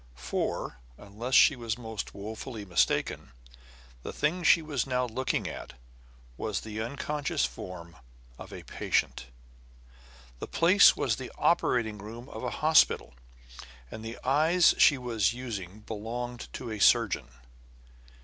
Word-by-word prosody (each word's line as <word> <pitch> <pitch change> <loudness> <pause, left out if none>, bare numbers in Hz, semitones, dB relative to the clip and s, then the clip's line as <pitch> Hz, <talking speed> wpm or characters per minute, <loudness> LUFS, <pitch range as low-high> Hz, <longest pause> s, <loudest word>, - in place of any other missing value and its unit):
For, 65 0 -3 0.2
unless 110 +6 -4
she 145 - +7
was 115 -3 -3
most 110 -3 -6
woefully 110 +2 -7
mistaken, 85 -7 0 0.7
the - - -6
thing 155 +5 -1
she 170 -1 +5
was 140 -5 -2
now 125 -1 0
looking 125 +2 -2
at - - -8 0.6
was 105 -4 -3
the 110 0 -5
unconscious 145 +4 -2
form 85 -2 -8 0.4
of - - -10
a - - -9
patient; 65 - -1 1.1
the - - -6
place 185 +5 +6
was - - 0
the - - -7
operating 110 -4 +1
room 115 +6 -9
of - - -8
a 125 - -1
hospital; 155 - +3 0.8
and 110 - -8
the 115 +1 -6
eyes 160 +7 +4
she 145 - +6
was 115 -5 0
using 110 -6 -7
belonged 115 +3 -6
to 120 -3 -6
a 110 - -5
surgeon. 80 - +3
115 Hz, 130 wpm, -29 LUFS, 105-130 Hz, 1.1 s, she